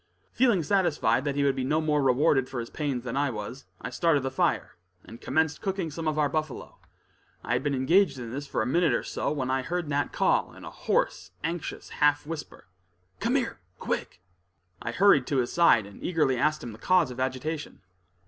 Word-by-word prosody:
Feeling 235 Hz, -10 st, +3 dB
satisfied 165 Hz, -6 st, +2 dB
that 140 Hz, -1 st, -1 dB
he 145 Hz, -, +1 dB
would 140 Hz, -1 st, +2 dB
be 130 Hz, -, -2 dB
no 150 Hz, +4 st, +1 dB
more 150 Hz, -2 st, +1 dB
rewarded 135 Hz, 0 st, +3 dB
for 130 Hz, -, -4 dB
his 115 Hz, -, -6 dB
pains 140 Hz, -5 st, -2 dB
than 125 Hz, -1 st, -4 dB
I 140 Hz, +1 st, +1 dB
was, 120 Hz, +3 st, -6 dB
I 125 Hz, -, -6 dB
started 150 Hz, -1 st, +2 dB
the 135 Hz, -, -2 dB
fire, 130 Hz, -, 0 dB, 0.3 s
and 115 Hz, -, -12 dB
commenced 160 Hz, -1 st, 0 dB
cooking 190 Hz, -5 st, -2 dB
some 160 Hz, +1 st, -4 dB
of 155 Hz, -1 st, 0 dB
our 150 Hz, -1 st, +3 dB
buffalo, 155 Hz, -1 st, -4 dB, 0.6 s
I -, -, -1 dB
had 125 Hz, -, +1 dB
been 145 Hz, 0 st, 0 dB
engaged 155 Hz, +3 st, +3 dB
in 120 Hz, -2 st, -6 dB
this 140 Hz, +3 st, -5 dB
for -, -, -1 dB
a -, -, -3 dB
minute 165 Hz, +1 st, +2 dB
or -, -, -1 dB
so, -, -, -2 dB
when 130 Hz, -4 st, -2 dB
I 130 Hz, 0 st, +1 dB
heard 175 Hz, +4 st, -3 dB
Nat 145 Hz, 0 st, 0 dB
call, -, -, +1 dB
in -, -, -11 dB
a -, -, -8 dB
hoarse, 90 Hz, -1 st, -1 dB
anxious, 165 Hz, 0 st, -4 dB
half 145 Hz, -1 st, +2 dB
whisper: 155 Hz, -, -7 dB, 0.5 s
"Come 240 Hz, +3 st, 0 dB
here, 250 Hz, -4 st, -1 dB, 0.2 s
quick!" 90 Hz, -, -4 dB, 0.6 s
I -, -, -3 dB
hurried 180 Hz, -10 st, +4 dB
to 140 Hz, -, 0 dB
his 125 Hz, -2 st, 0 dB
side 170 Hz, -11 st, +5 dB
and 100 Hz, 0 st, -13 dB
eagerly 155 Hz, -7 st, +1 dB
asked 150 Hz, +5 st, +1 dB
him 120 Hz, -, -6 dB
the 110 Hz, -, -12 dB
cause 180 Hz, -7 st, +3 dB
of 125 Hz, -, -8 dB
agitation. 130 Hz, +3 st, -3 dB
145 Hz, 210 wpm, -27 LUFS, 130-160 Hz, 0.6 s, side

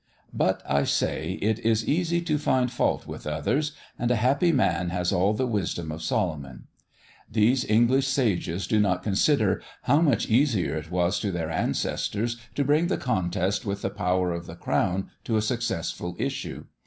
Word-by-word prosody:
But -, -, +1 dB
I 70 Hz, 0 st, +2 dB
say, 80 Hz, +4 st, 0 dB
it 110 Hz, +1 st, +1 dB
is 115 Hz, -1 st, +1 dB
easy 170 Hz, +2 st, +1 dB
to 155 Hz, -3 st, 0 dB
find 130 Hz, -4 st, +1 dB
fault -, -, 0 dB
with -, -, -8 dB
others, 125 Hz, -, 0 dB, 0.3 s
and 120 Hz, -, 0 dB
a 125 Hz, -, +3 dB
happy 135 Hz, +9 st, +3 dB
man 90 Hz, -, +1 dB
has 90 Hz, 0 st, -1 dB
all 95 Hz, +4 st, +2 dB
the 130 Hz, -, 0 dB
wisdom 95 Hz, -8 st, -2 dB
of 80 Hz, +1 st, -6 dB
Solomon. 75 Hz, -5 st, -2 dB, 0.7 s
These 115 Hz, +4 st, +2 dB
English 120 Hz, +5 st, +4 dB
sages 105 Hz, -9 st, 0 dB
do 110 Hz, -, +2 dB
not 90 Hz, -3 st, +1 dB
consider 105 Hz, 0 st, +2 dB, 0.2 s
how 145 Hz, +3 st, +3 dB
much 145 Hz, -8 st, +2 dB
easier 115 Hz, -, +2 dB
it 80 Hz, 0 st, -5 dB
was 90 Hz, +1 st, +1 dB
to 100 Hz, -, -1 dB
their 85 Hz, -3 st, -3 dB
ancestors 110 Hz, +7 st, -1 dB, 0.2 s
to 145 Hz, -, +1 dB
bring 150 Hz, +5 st, +3 dB
the 190 Hz, -, 0 dB
contest 95 Hz, -4 st, -1 dB
with 100 Hz, -1 st, -4 dB
the 95 Hz, -, -1 dB
power 90 Hz, -3 st, 0 dB
of 85 Hz, 0 st, -5 dB
the 80 Hz, -, -8 dB
crown 95 Hz, +2 st, -1 dB
to 115 Hz, -, +1 dB
a -, -, +2 dB
successful 110 Hz, -7 st, -2 dB
issue. -, -, -4 dB
105 Hz, 175 wpm, -26 LUFS, 90-125 Hz, 0.7 s, English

